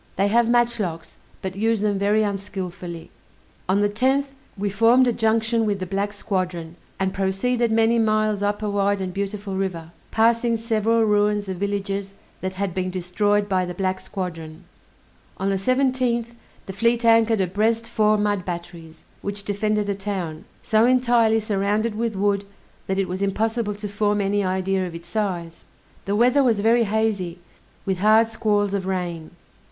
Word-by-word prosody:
They 200 Hz, +2 st, +2 dB
have 235 Hz, +2 st, +3 dB
match 240 Hz, 0 st, +2 dB
locks, 165 Hz, -5 st, -4 dB, 0.3 s
but 190 Hz, -1 st, -4 dB
use 220 Hz, +1 st, +1 dB
them 205 Hz, -2 st, 0 dB
very 210 Hz, +2 st, +2 dB
unskillfully. 190 Hz, -4 st, -5 dB, 0.6 s
On 195 Hz, +2 st, +3 dB
the 205 Hz, -, +4 dB
10th, 265 Hz, +6 st, 0 dB, 0.2 s
we 205 Hz, +1 st, -1 dB
formed 230 Hz, +6 st, +4 dB
a 245 Hz, -, +2 dB
junction 225 Hz, +1 st, +1 dB
with 200 Hz, -1 st, 0 dB
the 185 Hz, -, -3 dB
black 200 Hz, +2 st, -2 dB
squadron, 180 Hz, -5 st, -3 dB, 0.2 s
and 190 Hz, 0 st, 0 dB
proceeded 220 Hz, +5 st, 0 dB
many 225 Hz, +1 st, +3 dB
miles 215 Hz, -2 st, +1 dB
up 205 Hz, +1 st, -1 dB
a 210 Hz, -, -1 dB
wide 200 Hz, 0 st, +1 dB
and 185 Hz, -1 st, -4 dB
beautiful 200 Hz, 0 st, -4 dB
river, 175 Hz, -4 st, -3 dB, 0.2 s
passing 230 Hz, +1 st, +2 dB
several 225 Hz, 0 st, +1 dB
ruins 210 Hz, -1 st, +2 dB
of 190 Hz, -1 st, -4 dB
villages 200 Hz, 0 st, -3 dB, 0.2 s
that 185 Hz, 0 st, -4 dB
had 195 Hz, -1 st, -2 dB
been 185 Hz, 0 st, -2 dB
destroyed 200 Hz, +3 st, 0 dB
by 190 Hz, -2 st, +1 dB
the 180 Hz, -1 st, -5 dB
black 185 Hz, 0 st, -1 dB
squadron. 165 Hz, -4 st, -6 dB, 0.7 s
On 195 Hz, +1 st, -1 dB
the -, -, +1 dB
17th, 255 Hz, +1 st, +1 dB, 0.4 s
the 190 Hz, -, -7 dB
fleet 235 Hz, +4 st, +1 dB
anchored 225 Hz, -1 st, +4 dB
abreast 215 Hz, +5 st, 0 dB
four 215 Hz, -2 st, +2 dB
mud 205 Hz, -2 st, 0 dB
batteries, 170 Hz, -2 st, -8 dB, 0.2 s
which 200 Hz, 0 st, -4 dB
defended 210 Hz, +1 st, -1 dB
a 200 Hz, -, 0 dB
town, 195 Hz, -6 st, -5 dB, 0.2 s
so 220 Hz, 0 st, +3 dB
entirely 240 Hz, -3 st, +4 dB
surrounded 210 Hz, +1 st, 0 dB
with 225 Hz, 0 st, -2 dB
wood 200 Hz, 0 st, +1 dB, 0.4 s
that 190 Hz, -, -1 dB
it 195 Hz, -1 st, 0 dB
was 185 Hz, +2 st, -4 dB
impossible 215 Hz, +2 st, -1 dB
to 210 Hz, +1 st, -6 dB
form 205 Hz, +1 st, 0 dB
any 200 Hz, 0 st, +1 dB
idea 190 Hz, 0 st, 0 dB
of 170 Hz, -, -8 dB
its 170 Hz, +1 st, -10 dB
size. 175 Hz, -5 st, -3 dB, 0.4 s
The 200 Hz, -, 0 dB
weather 250 Hz, +5 st, +4 dB
was 230 Hz, -5 st, +2 dB
very 230 Hz, +2 st, +3 dB
hazy, 205 Hz, -5 st, -1 dB, 0.5 s
with 190 Hz, -2 st, -1 dB
hard 220 Hz, +3 st, +5 dB
squalls 205 Hz, -2 st, 0 dB
of 190 Hz, -2 st, -2 dB
rain. 175 Hz, -4 st, -3 dB
205 Hz, 170 wpm, -23 LUFS, 190-225 Hz, 0.7 s, hard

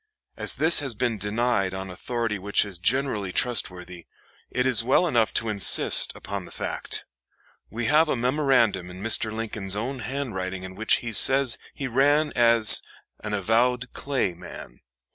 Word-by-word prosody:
As -, -, -2 dB
this 160 Hz, +2 st, +4 dB
has 135 Hz, -6 st, -3 dB
been 115 Hz, -2 st, -2 dB
denied 105 Hz, -2 st, -1 dB
on 95 Hz, 0 st, -6 dB
authority 115 Hz, +2 st, -4 dB
which 100 Hz, +2 st, 0 dB
is 95 Hz, -4 st, -8 dB
generally 105 Hz, -2 st, -1 dB
trustworthy, 90 Hz, -7 st, -2 dB, 0.4 s
it 125 Hz, -, -2 dB
is 125 Hz, -3 st, +5 dB
well 130 Hz, +9 st, +2 dB
enough 120 Hz, -9 st, +1 dB
to 115 Hz, -, -1 dB
insist 105 Hz, -2 st, +4 dB
upon 100 Hz, -2 st, -7 dB
the -, -, -13 dB
fact. -, -, -5 dB, 0.6 s
We 120 Hz, +1 st, -5 dB
have 155 Hz, +6 st, +3 dB
a -, -, 0 dB
memorandum 125 Hz, -7 st, 0 dB
in 90 Hz, +2 st, -10 dB
Mr. 110 Hz, 0 st, +1 dB
Lincoln's 105 Hz, -3 st, -4 dB
own 130 Hz, +6 st, -4 dB
handwriting 105 Hz, -7 st, -5 dB
in 95 Hz, 0 st, -8 dB
which 110 Hz, +4 st, +2 dB
he 115 Hz, -, -5 dB
says 135 Hz, +3 st, +5 dB, 0.2 s
he 140 Hz, -, -6 dB
ran 145 Hz, +5 st, +1 dB
as 115 Hz, -3 st, +5 dB, 0.4 s
"an 105 Hz, -1 st, -3 dB
avowed 120 Hz, +5 st, 0 dB
Clay 135 Hz, -10 st, -2 dB
man." 85 Hz, -, -12 dB
115 Hz, 160 wpm, -24 LUFS, 100-130 Hz, 0.6 s, is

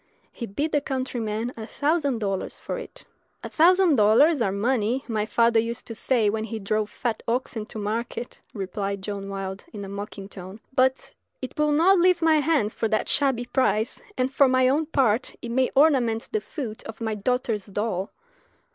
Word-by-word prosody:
He 235 Hz, -, -6 dB
bid 290 Hz, +11 st, -2 dB
the 290 Hz, -, +2 dB
countryman 245 Hz, -4 st, -3 dB
a 220 Hz, -1 st, -7 dB
thousand 285 Hz, -2 st, 0 dB
dollars 195 Hz, -3 st, -3 dB
for -, -, -4 dB
it. -, -, -11 dB, 0.4 s
"A -, -, -5 dB
thousand 350 Hz, -1 st, +5 dB
dollars 235 Hz, +8 st, +5 dB
are 200 Hz, -4 st, +2 dB
money, 235 Hz, +4 st, 0 dB
my 215 Hz, -3 st, -1 dB
father 230 Hz, +1 st, +3 dB
used 230 Hz, +1 st, -3 dB
to 230 Hz, -, -7 dB
say 230 Hz, -1 st, +1 dB
when 215 Hz, +1 st, 0 dB
he 225 Hz, 0 st, -5 dB
drove 215 Hz, +1 st, -1 dB
fat 230 Hz, -1 st, -3 dB
oxen 230 Hz, -2 st, -2 dB
to -, -, -8 dB
market," 230 Hz, +3 st, -4 dB
replied 195 Hz, 0 st, -4 dB
John 200 Hz, -1 st, -5 dB
Wilde, 195 Hz, 0 st, -5 dB
in 205 Hz, -2 st, -7 dB
a -, -, -8 dB
mocking 200 Hz, 0 st, -7 dB
tone; 190 Hz, +1 st, -10 dB
"but 260 Hz, 0 st, +1 dB, 0.3 s
it 255 Hz, -, -7 dB
will 300 Hz, 0 st, +2 dB
not 350 Hz, +6 st, +5 dB
leave 355 Hz, -1 st, +3 dB
my 320 Hz, -1 st, +5 dB
hands 290 Hz, -8 st, +1 dB
for 225 Hz, -, -1 dB
that 215 Hz, 0 st, 0 dB
shabby 265 Hz, -4 st, +1 dB
price, 240 Hz, -3 st, 0 dB, 0.2 s
and, 255 Hz, +1 st, 0 dB
for 275 Hz, 0 st, +5 dB
my 255 Hz, 0 st, +3 dB
own 295 Hz, +4 st, +1 dB
part, 255 Hz, -7 st, +1 dB
it 240 Hz, -, -7 dB
may 260 Hz, +1 st, +2 dB
ornament 260 Hz, -6 st, +3 dB
the 435 Hz, -, 0 dB
foot 245 Hz, -, -6 dB
of 220 Hz, -, -8 dB
my 220 Hz, -1 st, -2 dB
daughter's 220 Hz, -1 st, -1 dB
doll! 200 Hz, -1 st, -2 dB
230 Hz, 185 wpm, -25 LUFS, 210-270 Hz, 0.4 s, thousand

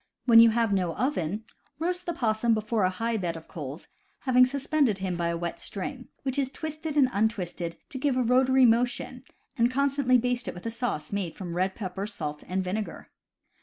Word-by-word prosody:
When 230 Hz, -2 st, +8 dB
you 230 Hz, 0 st, +9 dB
have 225 Hz, -2 st, +1 dB
no 180 Hz, -4 st, 0 dB
oven, 215 Hz, -, -1 dB, 0.3 s
roast 360 Hz, +3 st, -2 dB
the 345 Hz, -, 0 dB
possum 225 Hz, -4 st, +1 dB
before 215 Hz, -1 st, 0 dB
a -, -, +3 dB
high 225 Hz, +5 st, -1 dB
bed 170 Hz, -4 st, -2 dB
of 160 Hz, -, -12 dB
coals, 150 Hz, -3 st, -7 dB, 0.3 s
having 255 Hz, -1 st, +5 dB
suspended 275 Hz, -4 st, +1 dB
him 190 Hz, -2 st, -2 dB
by 170 Hz, 0 st, -1 dB
a 170 Hz, 0 st, -1 dB
wet 170 Hz, 0 st, -4 dB
string, 250 Hz, +6 st, -5 dB, 0.2 s
which 265 Hz, 0 st, -1 dB
is 270 Hz, -2 st, +1 dB
twisted 310 Hz, +1 st, -5 dB
and 275 Hz, -3 st, +6 dB
untwisted 180 Hz, -5 st, -1 dB
to 265 Hz, -, -6 dB
give 265 Hz, -1 st, +1 dB
a 255 Hz, -, +3 dB
rotary 260 Hz, +2 st, +4 dB
mo 235 Hz, +1 st, +5 dB
tion, 250 Hz, 0 st, -5 dB, 0.4 s
and 235 Hz, +1 st, +5 dB
constantly 275 Hz, -1 st, +3 dB
baste 245 Hz, 0 st, -1 dB
it -, -, -4 dB
with 175 Hz, -, -10 dB
a 230 Hz, -, -2 dB
sauce 225 Hz, -9 st, -3 dB
made 190 Hz, -5 st, -2 dB
from 175 Hz, -3 st, -6 dB
red 185 Hz, +2 st, 0 dB
pepper, 195 Hz, -1 st, -4 dB
salt, 150 Hz, -8 st, -5 dB
and 185 Hz, +2 st, -1 dB
vinegar. 200 Hz, +3 st, -4 dB
230 Hz, 205 wpm, -27 LUFS, 185-255 Hz, 0.4 s, you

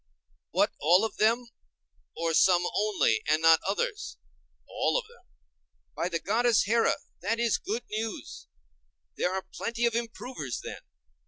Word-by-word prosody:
What, -, -, +2 dB
all 175 Hz, +8 st, +4 dB
of 225 Hz, -, -6 dB
them, 230 Hz, +3 st, +2 dB, 0.7 s
or 165 Hz, 0 st, 0 dB
some 180 Hz, +1 st, +5 dB
only 200 Hz, -, +2 dB
and 155 Hz, +1 st, +3 dB
not 165 Hz, 0 st, +6 dB
others? 420 Hz, -, -2 dB, 0.5 s
All -, -, 0 dB
of -, -, -2 dB
them. 475 Hz, -, -21 dB, 0.7 s
By 175 Hz, -, -1 dB
the 170 Hz, -, -1 dB
goddess 230 Hz, +5 st, +2 dB
Here, 230 Hz, +2 st, +3 dB, 0.3 s
that 225 Hz, +5 st, -1 dB
is 235 Hz, -2 st, +1 dB
good 225 Hz, +4 st, -3 dB
news! 220 Hz, +1 st, -5 dB, 0.7 s
There 180 Hz, -, 0 dB
are 190 Hz, 0 st, -2 dB
plenty 235 Hz, +1 st, -2 dB
of 235 Hz, -, +1 dB
improvers, 230 Hz, -, -4 dB
then. -, -, -8 dB
215 Hz, 145 wpm, -28 LUFS, 175-235 Hz, 0.7 s, not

